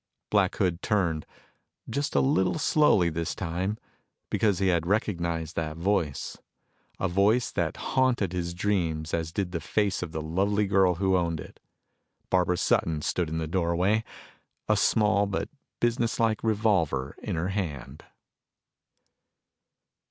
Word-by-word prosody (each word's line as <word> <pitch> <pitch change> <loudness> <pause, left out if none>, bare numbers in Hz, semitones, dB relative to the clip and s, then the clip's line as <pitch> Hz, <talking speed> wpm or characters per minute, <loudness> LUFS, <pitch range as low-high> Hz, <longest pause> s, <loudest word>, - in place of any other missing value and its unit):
Black 100 -3 +3
Hood 90 -3 0
turned, 85 -8 0 0.6
just 145 +2 -2
a - - +5
little 135 -3 +2
slowly 150 - +3
this 85 +1 -3
time, 95 +4 -2 0.5
because 105 -4 +2
he 95 -1 +2
had 85 -2 +1
recognized 85 -6 -1
that 80 -1 -3
voice 85 -6 -1 0.6
a 95 - +1
voice 100 +7 +2
that - - -1
haunted 125 -8 +1
his 85 -1 -3
dreams 85 -5 -1
as 80 -1 -1
did 95 0 -2
the 85 - -2
face 100 +5 0
of 85 -3 -5
the 80 - -3
lovely 100 +6 +1
girl 95 -2 +3
who 95 +1 +1
owned 85 -3 0
it. - - -11 0.7
Barbara 90 -1 +2
Sutton 80 -3 +1
stood 90 -3 -1
in 80 - -3
the 80 - -1
doorway, 90 +5 +1 0.6
a 110 - +3
small 105 -1 +3
but 100 - -3 0.3
businesslike 115 -2 +1
revolver 100 - +1
in - - -3
her 85 +3 -1
hand. 75 -8 -4
95 Hz, 135 wpm, -27 LUFS, 85-105 Hz, 0.7 s, a